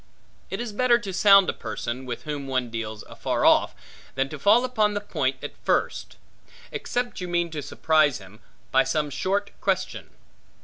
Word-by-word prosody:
It 195 - -4
is 235 -3 -4
better 245 +2 +4
to 200 -5 -6
sound 195 0 +6
a - - 0
person, 120 +3 -5
with 120 -2 -5
whom 145 -2 -5
one 130 -3 -1
deals 110 -2 -5
afar - - -2
off, - - +4 0.4
than 135 +1 0
to 150 - -7
fall 220 - +5
upon 215 -5 +1
the - - 0
point 205 - -1
at - - -6
first; - - -1 0.5
except 245 -4 -3
you 180 - -3
mean 175 -1 0
to 155 -2 -4
surprise 155 -1 +2
him 95 +2 -14 0.3
by 165 - +5
some 150 -2 -1
short 200 +8 -1
question. 190 -1 -2
170 Hz, 175 wpm, -25 LUFS, 135-205 Hz, 0.5 s, sound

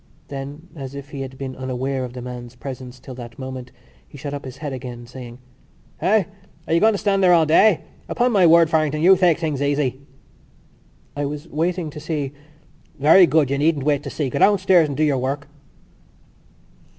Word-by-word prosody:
Then, 145 +4 -7
as 135 -2 -7
if 140 +1 -9
he 140 - -6
had 130 -1 -7
been 130 -1 -6
unaware 130 +1 -3
of 125 -1 -6
the 125 -1 -7
man's 125 -1 -8
presence 130 -1 -8
till 130 - -10
that 120 0 -10
moment, 130 -2 -7 0.4
he - - -13
shot 140 0 -6
up 140 -1 -6
his 130 - -8
head 145 -3 -5
again, 120 -2 -7
saying: 120 -1 -10 0.6
"Eh? 215 0 +3 0.4
Are - - 0
you 165 - +4
going 220 +2 +4
to - - -1
stand 200 -1 +1
there 180 -1 +6
all 165 -2 +5
day? 170 +4 +4 0.3
Upon 245 +1 +1
my 190 -6 +5
word, 165 0 +6
Farrington, 155 -1 +1
you 190 +2 +8
take 175 -3 +3
things 155 -5 -2
easy!" 140 -2 0 1.1
"I 145 0 -2
was 150 +3 -5
waiting 165 +1 -1
to 150 - -8
see...." 150 -3 -3 0.7
"Very 165 +6 +7
good, 150 -5 +2
you 140 - 0
needn't 150 -2 +1
wait 145 -2 +2
to 145 - -6
see. 140 -2 -3
Go 140 - -2
downstairs 185 -5 +4
and 140 -2 -5
do 155 - +2
your 145 -4 +2
work." 140 +2 -3
145 Hz, 200 wpm, -21 LUFS, 130-165 Hz, 1.1 s, you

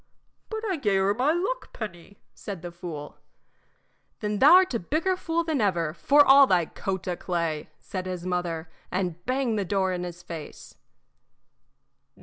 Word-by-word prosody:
"But 440 0 -4
I 375 -4 0
gave 205 -8 +1
her 195 +1 +2
my 255 +7 +2
luck 390 +10 -2
penny," 200 -2 -8 0.2
said 195 -5 -7
the 175 - -6
fool. 165 -4 -8 1.0
"Then 210 -1 -2
thou 300 +7 +9
'rt 370 -6 +3
a 235 - 0
bigger 320 - 0
fool 335 -2 -1
than 315 -6 -1
ever, 170 -6 +1
for 280 - +5
all 275 0 +8
thy 180 -5 +3
coat 190 +3 -4
o' 180 - -1
clay!" 170 -4 -2
said 185 -1 -5
his 180 -1 -5
mother, 175 -3 -2 0.2
and 175 -2 -2
banged 255 -4 0
the - - 0
door 190 -1 0
in 180 0 -3
his 175 0 -7
face. 165 -3 -9
190 Hz, 165 wpm, -26 LUFS, 175-275 Hz, 1.0 s, thou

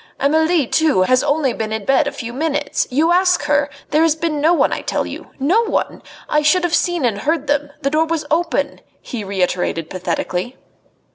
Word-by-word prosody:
Amelie, 315 +2 +2
too, 300 -7 +2
has 255 +6 +3
only 285 -4 +1
been 220 -1 -4
in 220 -2 -3
bed 275 +2 +3
a - - -1
few 240 -4 -7
minutes. 295 +1 -1
You 310 +6 +2
ask 365 +1 +3
her! 290 -1 +1 0.2
There 305 - +3
has 325 -2 +3
been 315 -2 -2
no 320 +3 +4
one, 350 - +2
I - - -3
tell - - -2
you - - -8
no 345 +12 +3
one! 450 - -2 0.3
I 300 - +2
should 305 +5 +3
have 350 -2 -1
seen 350 -6 +1
and 215 -4 0
heard 305 +5 -1
them 290 0 0
the 275 - +1
door 315 +2 +2
was 320 -2 -2
open," 335 +2 0 0.2
he 235 -4 -6
reiterated 180 -4 -2
pathetically. 185 +4 -3
290 Hz, 200 wpm, -18 LUFS, 245-320 Hz, 0.3 s, no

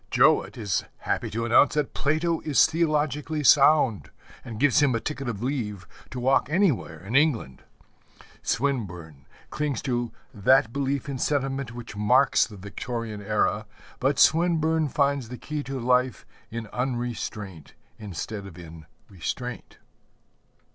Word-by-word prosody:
Jowett 135 +2 +3
is 105 -5 -1 0.2
happy - - -2
to 115 +2 -3
announce 120 +6 +4
that 150 -2 -1
Plato 160 +3 0
is 150 -3 +4
theologically 150 -2 0
sound, 140 -5 +5 0.3
and 115 -3 -8
gives 145 +2 +4
him 135 -4 +3
a - - 0
ticket 130 +3 -4
of 110 -1 -5
leave 110 -8 -3 0.2
to 130 - -6
walk 130 +2 +2
anywhere 155 - +1
in 110 +5 -4
England. 135 - +2 0.8
Swinburne 90 - -3 0.2
clings 150 -5 -2
to 120 -3 -1 0.2
that 115 +3 +3
belief 140 -1 -1
in 135 -2 -4
sentiment 135 -3 -1
which 120 -3 -8
marks 125 +6 +3
the 105 -3 -12
Victorian 110 +2 -5
era, 105 0 0 0.3
but 135 +1 +1
Swinburne 160 -2 +3
finds 140 -4 0
the 125 - -7
key 150 +3 -4
to 135 -2 -5
life 125 +1 +1 0.2
in 115 0 -5
unrestraint 120 - -4 0.2
instead 100 0 -6
of 90 -3 -12
in 80 -2 -11 0.2
restraint. 105 +8 -6
125 Hz, 135 wpm, -26 LUFS, 105-140 Hz, 0.8 s, sound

